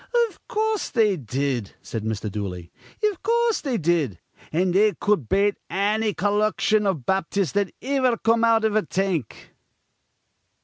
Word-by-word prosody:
"Iv - - -20
coorse, 435 -1 -1
they 215 -5 +3
did," 130 - -3
said 115 -2 -5
Mr. 110 -1 -3
Dooley. 90 -4 -5 0.3
"Iv 420 -4 0
coorse, 465 +1 +1
they 265 -5 -1
did. 160 - 0 0.3
An' 180 +3 +1
they 205 +3 +3
cud 205 - 0
bate 200 +1 +2
anny 210 +2 +1
collection 210 +1 +1
iv 160 -11 -1
Baptists 190 0 0
that 200 -2 0
iver 260 -3 +1
come 230 +1 +2
out 225 -1 +4
iv 215 -1 +1
a 215 - +4
tank." 180 - -3
200 Hz, 145 wpm, -24 LUFS, 150-225 Hz, 0.3 s, out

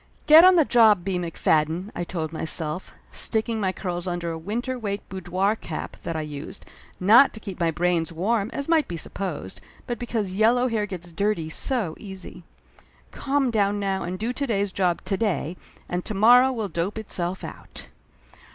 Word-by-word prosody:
"Get 315 +2 +9
on 370 0 +8
the 325 -4 +5
job, 220 -8 +5
B. 190 -2 -1
McFadden," 165 +2 0
I 175 - -2
told 165 -2 -4
myself, 160 +1 -2 0.2
stick 220 +1 0
ing 225 -2 -2
my 190 -2 +1
curls 180 -2 -4
under 175 -1 -2
a - - -4
winter 240 +8 -3
weight 205 -2 -4
boudoir 190 +2 -1
cap 165 -7 -6
that 165 - -4
I 160 - -1
used, 150 -1 -8 0.3
not 220 +9 +6
to - - -8
keep 195 -4 -8
my 170 -1 +2
brains 170 0 0
warm 200 +5 0
as 280 - -4
might 325 -2 +3
be 170 - -5
sup - - -7
posed, 175 - -5 0.2
but 240 -2 -4
because 225 -6 -2
yellow 235 +5 +3
hair 215 -3 -1
gets 175 -3 -8
dirty 170 -2 -1
so 215 - -1
easy. 190 -3 -9 0.7
"Calm 275 -2 0
down 205 -2 +1
now, 195 -1 -1
and 180 +2 -4
do 225 +5 -2
to 280 +2 -2
day's 200 -4 0
job 180 -2 0
to 195 - 0
day, 180 -6 -1 0.3
and 180 0 -3
to 215 - -4
morrow 245 +6 +6
will 225 -5 -3
dope 175 +4 -3
itself 185 -4 -3
out!" - - -9
195 Hz, 190 wpm, -24 LUFS, 175-225 Hz, 0.7 s, Get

